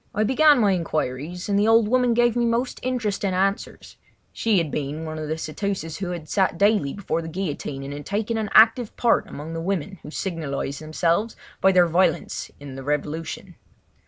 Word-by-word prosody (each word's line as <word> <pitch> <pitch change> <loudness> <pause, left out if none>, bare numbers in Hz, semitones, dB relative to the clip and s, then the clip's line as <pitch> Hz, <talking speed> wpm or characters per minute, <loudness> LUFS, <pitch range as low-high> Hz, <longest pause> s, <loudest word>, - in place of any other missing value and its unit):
I 210 - +2
began 290 +6 +5
my 205 -4 +4
inquiries, 165 -1 -2
and 200 -1 +2
the 210 - +3
old 225 -1 +5
woman 250 0 +2
gave 240 -1 +3
me 240 - +1
most 235 +2 0
interesting 210 -6 -1
answers—she 195 +2 -2
had 165 -4 0
been 150 +2 -3
one 155 0 -5
of 155 - -4
the 160 +1 -2
ceteuces 165 +1 -4
who 180 -2 -3
sat 190 0 +1
daily 200 -8 +3
before 190 -4 -2
the 165 - -7
guillotine 155 -5 -4
and 140 +1 -6
had 145 0 -7
taken 215 +3 -1
an 215 -2 -2
active 225 +1 +5
part 235 -1 +2
among 155 +3 -7
the 165 - -4
women 190 0 -3
who - - -10
signalised 155 -5 -4
themselves 170 +7 0 0.3
by 190 - +5
their 180 -2 +5
violence 170 0 0
in 140 -2 -9
the 135 0 -8
revolution. 150 +3 -3
185 Hz, 185 wpm, -24 LUFS, 155-215 Hz, 0.3 s, began